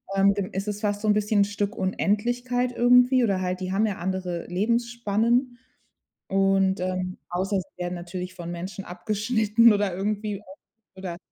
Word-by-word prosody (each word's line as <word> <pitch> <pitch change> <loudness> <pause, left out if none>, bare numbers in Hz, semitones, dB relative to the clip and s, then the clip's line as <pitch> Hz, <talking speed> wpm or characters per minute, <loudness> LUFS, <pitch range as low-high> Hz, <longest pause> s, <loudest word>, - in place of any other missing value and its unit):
ähm, 200 +1 +5
g 200 -2 -3
ist 195 +2 -3
es 210 +1 -3
fast 205 -1 -1
so 215 - -2
'n 210 - +5
bisschen 210 -1 +2
Stück 205 +1 -2
Unendlichkeit 245 +6 0
irgendwie 250 +1 +5
oder 195 -4 +1
halt 185 0 -2
die 185 0 -4
haben 210 +3 +2
ja 205 -3 -2
andere 180 -2 -3
Lebensspannen 235 +4 0 0.7
und, 195 -1 +2
ähm 185 0 -2
außer 190 +2 0
sie 180 - -11
werden 180 0 -3
natürlich 180 +1 -6
von 175 -1 -6
Menschen 185 +2 -6
abgeschnitten 215 +4 +2
oder 200 -3 0
irgendwie 205 +1 -2 0.5
oder 180 -3 -6
200 Hz, 160 wpm, -25 LUFS, 185-220 Hz, 0.7 s, ähm